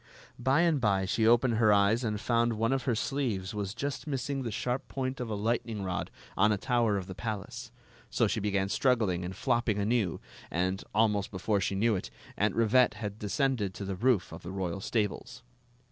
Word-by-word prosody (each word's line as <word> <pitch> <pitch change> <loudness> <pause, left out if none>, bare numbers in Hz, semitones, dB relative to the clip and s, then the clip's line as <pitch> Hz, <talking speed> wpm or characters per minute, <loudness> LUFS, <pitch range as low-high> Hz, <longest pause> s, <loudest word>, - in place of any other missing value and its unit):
By 130 +6 +3
and 165 -5 +2
by 100 -4 +2
she 110 +3 +1
opened 120 0 +4
her 110 -2 +5
eyes 105 +4 +3
and 105 -2 -1
found 115 +1 +1
one 115 +3 +1
of 135 - -1
her 120 - +1
sleeves 110 -7 -2
was 100 -1 -3
just 140 0 -4
missing 135 0 -2
the 120 - -3
sharp 125 +4 -2
point 130 0 -3
of 125 -2 -4
a 110 - -2
light 115 +4 0
ning 110 -4 -5
rod 90 -1 -3 0.3
on 105 +3 +4
a 105 - +2
tower 115 -2 +1
of 95 - -4
the 95 - -7
palace. 105 0 -5 0.4
So - - +2
she - - 0
began 100 -1 0
struggling 105 -6 +1
and 90 +2 -5
flopping 120 -3 +1
anew, 105 -3 0 0.3
and, 95 +3 -1
almost 105 -2 +2
before 100 +1 0
she 95 - -1
• - - -2
knew 110 +2 +3
it, 90 - -4 0.3
Aunt - - +1
Rivette 115 0 +4
had 105 -1 -5
descended 105 -2 0
to 100 - -5
the 95 0 -3
roof 115 -1 +2
of - - -8
the 90 - -7
royal 95 -1 -3
stables. 120 +4 -2
110 Hz, 205 wpm, -30 LUFS, 100-125 Hz, 0.4 s, her